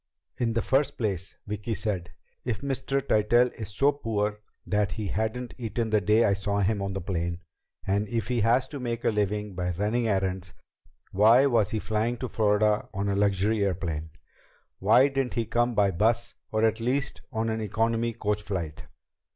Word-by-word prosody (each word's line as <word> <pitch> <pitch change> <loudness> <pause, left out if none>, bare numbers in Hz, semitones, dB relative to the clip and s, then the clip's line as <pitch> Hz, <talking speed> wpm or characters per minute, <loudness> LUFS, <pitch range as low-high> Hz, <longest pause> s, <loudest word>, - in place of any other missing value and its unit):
"In 115 -2 +1
the 115 - 0
first 135 +2 +1
place," 95 -5 -3
Vicki 105 +2 -3
said, 95 -5 -2 0.3
"if 120 -4 -3
Mr. 140 0 -2
Tytell 120 +4 +4
is 110 -3 -7
so 135 +8 +3
poor 105 -6 -2 0.3
that 105 -1 0
he 105 -4 -4
hadn't 110 +4 -2
eaten 115 -1 -2
the 105 -1 +3
day 105 +5 +4
I 100 - +3
saw 100 +1 -1
him 100 +1 +1
on 100 -1 -2
the 95 - -2
plane, 85 -1 -3 0.4
and 100 +2 0
if 115 -2 -1
he 120 -2 0
has 115 +4 +3
to 145 - -6
make 120 -2 -3
a - - +4
living 105 -1 -1
by 90 0 -2
running 110 +4 0
errands, 95 -3 -1 0.6
why 115 +7 +6
was 115 -7 +3
he 110 - -2
flying 110 +3 -1
to 130 - -4
Florida 105 -1 +2
on 100 +1 -1
a 100 - 0
luxury 100 +1 +2
airplane? 85 -5 -2 0.7
Why 115 +7 +5
didn't 135 -2 -2
he 115 - 0
come 120 +2 +1
by 100 -2 +3
bus, 110 +6 +1 0.2
or 110 0 +1
at 110 0 +1
least 135 +5 -1
on 115 -2 -1
an 110 0 -2
economy 115 +2 0
coach 105 -2 -1
flight?" 90 -7 -5
110 Hz, 185 wpm, -27 LUFS, 100-115 Hz, 0.7 s, why